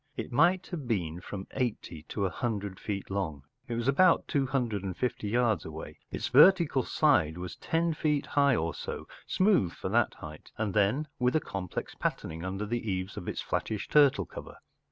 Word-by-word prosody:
It - - -4
might 175 +8 +3
have 155 -8 -5
been 90 -7 -1
from 95 +1 -6
eighty 115 - -3
to 100 - -1
a - - +1
hundred 100 -5 -3
feet 100 -2 -4
long—it 95 - -5
was 120 +1 -2
about 170 +6 +4
two 140 -2 +1
hundred 120 -7 -1
and 95 -2 -5
fifty 120 -4 -2
yards 115 -5 +2
away—its 80 0 -7
vertical 150 0 +6
side 120 - +2
was 90 -1 -6
ten 165 0 0
feet 150 -2 0
high 140 -2 +3
or 80 -5 -1
so, - - -6 0.2
smooth 185 - +3
for - - -5
that - - +2
height, 75 0 -10
and 110 -3 -1
then 110 +9 +2
with 125 +2 +2
a - - +5
complex 95 - -5
patterning 80 +1 -3
under 95 +3 -3
the 115 0 -3
eaves 95 +1 -3
of - - -7
its - - -3
flattish 105 -3 -3
turtle 145 -3 +5
cover. - - -10
110 Hz, 180 wpm, -29 LUFS, 95-140 Hz, 0.2 s, vertical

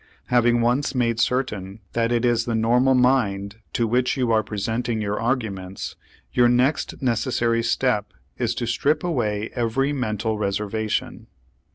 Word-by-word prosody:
Having 120 -1 +3
once 125 +5 +1
made 115 -2 +1
certain 110 -6 -1
that 115 0 +1
it 120 0 +1
is 120 -1 +2
the 115 - -1
normal 125 +4 +3
mind 110 -6 +1 0.2
to 115 - +1
which 125 +4 +1
you 125 -3 +1
are 110 -1 +4
presenting 110 +3 -2
your 105 -1 -2
arguments, 105 -6 -3 0.4
your 120 -1 +5
next 125 +4 +1
necessary 115 -1 +1
step 115 -2 0 0.2
is 120 -1 -1
to 120 - -2
strip 145 +6 +1
away 110 -11 -1
every 130 +4 0
mental 110 -4 -2
reservation. 105 +2 -2
115 Hz, 145 wpm, -23 LUFS, 110-125 Hz, 0.4 s, your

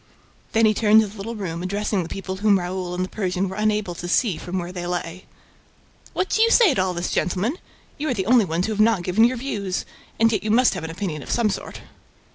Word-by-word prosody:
Then 225 0 +4
he 215 - +4
turned 215 0 +5
to 215 - -1
the 200 - -12
little 220 +3 -6
room, 170 -5 -4
addressing 200 +1 -1
the 170 - -6
people 190 -1 -5
whom 205 0 +4
Raoul 180 0 -4
and 185 +1 -1
the - - -11
Persian 190 -2 -1
were 190 - -6
unable 210 -3 0
to 175 +1 -7
see 190 +1 +2
from 180 +3 -5
where 175 0 -4
they 175 -1 -5
lay. 175 +1 -4 0.9
"What 375 - 0
do 440 - +1
you 460 - +5
say 455 - +5
to 215 - +1
all 185 -1 -1
this, 175 +1 -2
gentlemen? 200 - -1 0.4
You 305 +1 -2
are - - +1
the 190 -3 -2
only 235 0 +5
ones 170 +1 -1
who 220 - -2
have 210 - -6
not 215 -5 +3
given 195 +6 +4
your 250 +1 +1
views. 205 -8 -3 0.3
And 225 0 +4
yet 215 - 0
you 215 - -2
must 245 +4 +4
have - - -5
an 160 - -5
opinion 165 -3 -4
of - - -11
some 225 -3 +2
sort." - - -6
195 Hz, 255 wpm, -23 LUFS, 180-220 Hz, 0.9 s, turned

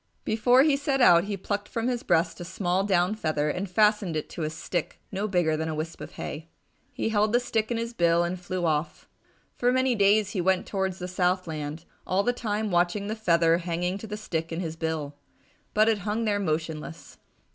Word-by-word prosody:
Before 245 +4 +4
he 300 -2 +4
set 280 -1 0
out, 175 -7 +6
he 200 -1 -3
plucked 205 +2 -3
from 230 +1 -2
his 245 -2 -1
breast 170 -3 +1
a - - -5
small 185 +1 -1
down 185 -1 +2
feather 155 -7 -1
and 185 +4 -4
fastened 210 -3 +2
it 155 - -4
to - - -6
a 155 - -1
stick 160 +1 -4
no 200 +2 -2
bigger 175 -5 +1
than 160 +1 -2
a 155 - -3
wisp 160 +2 -5
of - - -8
hay. 155 +3 -6 0.4
He - - -2
held 215 0 +2
the 240 - +5
stick 220 -3 -1
in 235 - -1
his 230 +1 -3
bill 170 -4 +3
and 175 +1 -3
flew 180 0 -3
off. 155 0 -1 0.5
For 245 0 +1
many 260 0 +2
days 205 -1 +3
he 190 - -1
went 190 +1 +2
towards 190 -2 -2
the 180 - -5
south 185 0 0
land, 155 0 -5 0.2
all 190 +2 +2
the 245 - +1
time 215 -3 -2
watching 175 +4 +1
the 220 - -2
feather 170 -5 +3
hanging 180 +2 -2
to 220 - -8
the 210 0 -5
stick 165 -6 -3
in 165 - -3
his 165 -3 -4
bill. 160 -3 -3 0.6
But 215 +1 +5
it 220 -2 +2
hung 210 +3 -2
there 205 -1 +1
motionless. 160 -2 -4
185 Hz, 215 wpm, -27 LUFS, 165-215 Hz, 0.6 s, out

